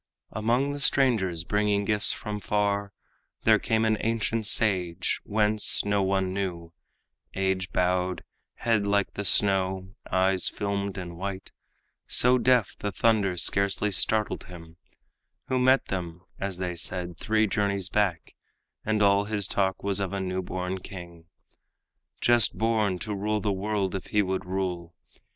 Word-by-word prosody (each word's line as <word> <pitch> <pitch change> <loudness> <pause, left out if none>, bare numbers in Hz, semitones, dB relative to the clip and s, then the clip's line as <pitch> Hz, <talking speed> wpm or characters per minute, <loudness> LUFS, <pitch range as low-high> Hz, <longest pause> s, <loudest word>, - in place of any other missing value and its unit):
Among 120 +6 0
the 145 - -5
strangers 110 -13 +2
bringing 105 +1 0
gifts 105 0 +3
from 105 0 -4
far, 100 -1 -1 0.5
There - - +5
came 110 0 +1
an 110 -1 +2
ancient 115 -1 -1
sage 95 -6 +1
whence, 105 0 +2
no 100 0 +1
one 95 -1 0
knew 85 -4 -4 0.6
Age 95 -1 -1
bowed, 90 0 0 0.3
head 110 -4 0
like 100 -1 +1
the 100 - -4
snow, 95 -1 +1 0.2
eyes 95 0 +2
filmed 100 -1 -3
and 85 -2 -7
white, 95 0 -5 0.6
So 125 +1 +4
deaf 125 -4 +2
the 105 - -3
thunder 100 -4 +1
scarcely 100 +3 +2
startled 105 +2 0
him, 85 -2 -12 0.7
Who 130 - +1
met 130 +1 +4
them, 85 -2 -4 0.2
as 100 -2 -3
they 90 -1 -3
said, 90 +1 -4
three 110 +5 +1
journeys 100 -2 -1
back, 95 -6 -1 0.5
And 110 -1 +1
all 100 0 +4
his 105 -2 -2
talk 95 -1 -1
was 100 -1 0
of 100 -1 -3
a 100 - -2
new 95 0 -2
born 90 +1 -4
king, 85 -3 -10 1.0
Just 120 -1 +3
born, 110 -4 +1
to 105 +3 -5
rule 105 +2 -1
the 105 0 -1
world 100 -1 -1
if 95 - -5
he 105 -1 +2
would 95 0 -3
rule. 90 -3 -3
100 Hz, 145 wpm, -27 LUFS, 95-105 Hz, 1.0 s, There